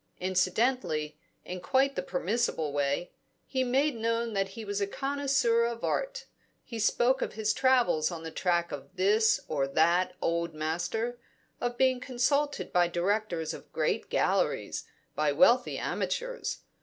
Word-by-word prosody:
Incidentally, 185 - 0 0.3
in 180 0 -6
quite 270 +4 +2
the - - -1
permissible 180 -5 -1
way, 145 +4 -1 0.3
he 260 -1 -1
made 270 +4 +2
known 230 0 -1
that 195 -1 0
he 225 - -6
was 205 0 -2
a 200 - +1
connoisseur 270 -2 +1
of 235 0 -4
art; - - -2 0.4
he 230 -2 -7
spoke 245 +4 +2
of - - -2
his 215 -1 0
travels 240 -12 +3
on 165 -2 -6
the 160 - -6
track 170 -1 0
of 145 +6 -8
this 210 +4 +3
or 140 -3 0
that 170 +5 +2
old 170 -1 -1
master, 175 +10 -2 0.4
of 245 0 -2
being 260 -1 +3
consulted 280 +4 0
by 175 -1 +4
directors 175 -1 -1
of - - -11
great - - -1
Galleries, - - 0 0.3
by 150 -1 +1
wealthy 240 - +4
amateurs. - - -3
215 Hz, 145 wpm, -29 LUFS, 170-250 Hz, 0.4 s, by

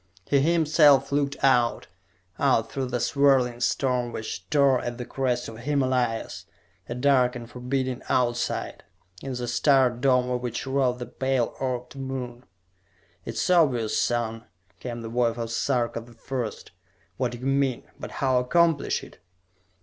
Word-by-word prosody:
He 140 - +2
himself 155 -2 +4
looked 140 0 0
out, 125 -3 +3 0.5
out 115 0 +2
through 135 -2 -2
the 125 0 -2
swirling 130 -2 +2
storm 125 0 0
which 110 -1 -6
tore 140 -4 +3
at 120 0 -4
the 125 - -5
crest 125 -2 -1
of 115 - -8
the - - -11
Himalayas, 130 -4 -1 0.4
a 120 - -3
dark 125 -1 +3
and 120 -1 -7
forbidding 130 +1 -3
Outside, 120 -2 -1 0.4
in 135 - -5
the 120 0 -4
starred 125 -1 +3
dome 125 -2 +3
of 125 -1 -1
which 120 0 -4
rode 130 -2 +1
the 125 - -5
pale 130 -2 -1
orbed 125 0 -3
moon! 130 -2 -6 0.8
"It 115 - -6
is - - -1
obvious, 130 -11 +3
son," 115 -1 -1 0.3
came 120 -2 -6
the - - -5
voice 120 0 0
of 115 -1 -4
Sarka 120 -1 0
the 120 +1 -15
First, 120 0 -5 0.5
"what 125 -2 -1
you 125 +2 -8
mean. 135 -2 +1 0.2
But - - -6
how 130 -2 +2
accomplish 165 +3 +2
it?" - - -14
125 Hz, 155 wpm, -25 LUFS, 120-135 Hz, 0.8 s, himself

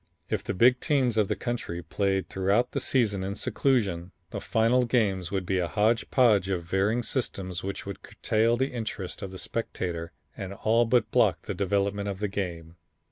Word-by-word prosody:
If - - 0
the - - -3
big 125 +5 +5
teams 135 -7 +1
of 105 -3 +3
the - - 0
country 100 -8 -4
played 95 +3 0
throughout 100 +6 +1
the - - -1
season 105 -7 +1
in 100 +1 -3
seclusion, 100 -9 0 0.2
the - - -4
final 115 +3 +3
games 100 -7 +1
would 95 -2 -2
be 95 +1 0
a 90 - 0
hodge 110 +4 +1
podge 105 -7 +4
of 90 -3 -1
varying 100 +7 +1
systems 95 -8 -2
which 100 +1 -5
would 100 -2 -7
curtail 115 +2 +1
the 130 +2 0
interest 110 -6 -5
of 100 - -4
the 95 - -9
spectator 85 -6 -4 0.2
and 95 0 -6
all 115 +3 +3
but 115 -1 +2
block - - +3
the - - -4
development 100 +1 0
of 100 - -4
the 105 +2 -1
game. 85 -4 -5
100 Hz, 190 wpm, -27 LUFS, 95-115 Hz, 0.2 s, big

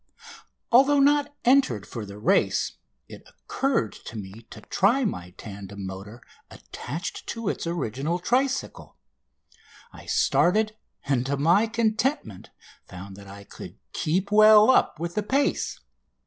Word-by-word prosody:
Although 275 +4 +5
not 290 +1 +2
entered 245 - +3
for 110 -4 -7
the 100 +1 -10
race 105 - +1 0.4
it - - -12
occurred 265 - -2
to 110 - -8
me 105 +3 -10
to - - -11
try 240 +7 +1
my 90 - -4
tandem 100 -2 -9
motor 100 +5 -9 0.3
attached 160 +9 -7
to 230 -3 -3
its - - -4
original 160 0 -2
tricycle. 260 +9 -2 1.0
I - - -13
started, 215 +4 +2 0.3
and 135 -3 +1
to 140 +1 -1
my 175 +10 +3
contentment 220 - -1 0.4
found 95 +1 -10
that 100 0 -13
I 100 +1 -11
could - - -11 0.2
keep 185 +6 -1
well 215 +2 +7
up 260 - +2
with 170 +1 -4
the 210 - -1
pace. 275 +7 -1
175 Hz, 135 wpm, -25 LUFS, -, 1.0 s, well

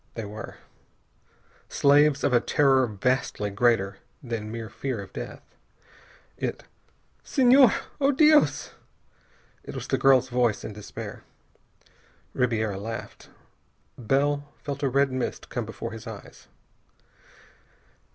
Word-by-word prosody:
They 115 - -5
were. 105 +2 -8 1.1
Slaves 145 0 +4
of 145 - +2
a 120 - +6
terror 135 0 +3
vastly 105 -1 -1
greater 100 -2 +1 0.2
than 115 -3 -4
mere 115 -1 -5
fear 130 +1 -4
of 100 - -9
death. - - -7 0.9
It - - -4 0.6
"Senhor!... 255 -2 +5 0.3
Oh, 280 0 +3
Dios!" 300 +2 +4 0.9
It - - -9
was - - -5
the - - -1
girl's 130 -2 +5
voice, 120 -3 +1
in 110 - -6
despair. 105 0 -8 1.1
Ribiera 110 -5 0
laughed. 115 +2 -7 0.7
Bell 145 +4 0
felt 140 -2 -5
a 140 - +1
red 140 +1 +2
mist 130 -1 -4
come 120 -4 -4
before 115 +1 -6
his 115 +1 -9
eyes. 110 -3 -11
125 Hz, 115 wpm, -26 LUFS, 110-140 Hz, 1.1 s, a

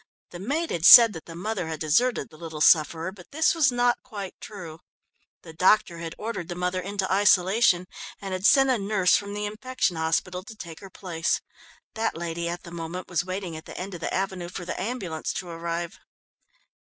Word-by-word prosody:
The 175 - -8
maid 290 - -2
had 165 - -3
said 230 +3 +10
that 160 - -9
the 165 - -10
mother 185 -1 -3
had 160 -2 -5
deserted 160 - +1
the - - -15
little 160 -1 -7
sufferer, 160 +2 +4
but 185 -2 -15
this 315 +2 +2
was 310 -5 +3
not 245 0 +1
quite 205 -6 -7
true. 170 -7 -9 0.6
The 160 - -11
doctor 185 0 +3
had 165 -1 -6
ordered 215 -6 -5
the 175 - -5
mother 180 +1 -2
into 195 0 -2
isolation, 190 -1 +4 0.3
and 195 -1 -5
had 185 +2 +2
sent 270 -1 +5
a 245 - +1
nurse 195 -2 +2
from 200 0 -2
the 210 0 -2
infection 215 -3 -2
hospital 165 +3 -1
to 220 - -11
take 170 -6 -9
her 195 - -11
place. 175 -3 -2 0.5
That 225 -5 -2
lady, 170 0 -3
at 175 +1 -5
the 170 - -11
moment, 170 +2 -6
was 175 -2 0
waiting 185 -2 -5
at 160 - -9
the - - -10
end 190 +1 -6
of 170 - -8
the - - -3
avenue 190 -2 -2
for 180 0 -7
the 180 - -4
ambulance 190 -8 -3
to 185 - -5
arrive. 170 0 -4
185 Hz, 205 wpm, -25 LUFS, 170-210 Hz, 0.6 s, said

